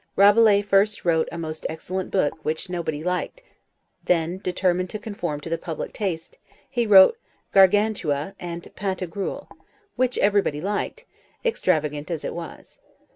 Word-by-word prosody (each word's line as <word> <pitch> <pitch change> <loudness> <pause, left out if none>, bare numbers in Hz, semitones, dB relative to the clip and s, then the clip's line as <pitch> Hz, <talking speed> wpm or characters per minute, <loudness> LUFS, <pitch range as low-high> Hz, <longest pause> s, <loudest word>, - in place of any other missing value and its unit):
Rabelais 205 0 +6
first 205 +1 +2
wrote 160 -2 +2
a - - -6
most 160 -1 -5
excellent 185 +4 -4
book, 155 -4 0
which 160 +4 -3
nobody 160 -4 -3
liked; 180 - -3 0.6
then, 175 +1 0
determined 185 -1 0
to 215 - -4
conform 180 -8 -5
to 155 - -7
the 165 - -1
public 165 -2 -5
taste, 180 -6 -4 0.3
he 240 -3 -1
wrote 205 - +7 0.3
Gargantua 195 -5 +3
and 170 -1 -6
Pantagruel, 190 -1 -4 0.5
which 255 0 +1
everybody 200 -7 +2
liked, 210 - -3 0.4
extravagant 155 - 0
as 165 -3 -3
it - - -3
was. 170 -1 -9
185 Hz, 135 wpm, -24 LUFS, 160-205 Hz, 0.6 s, wrote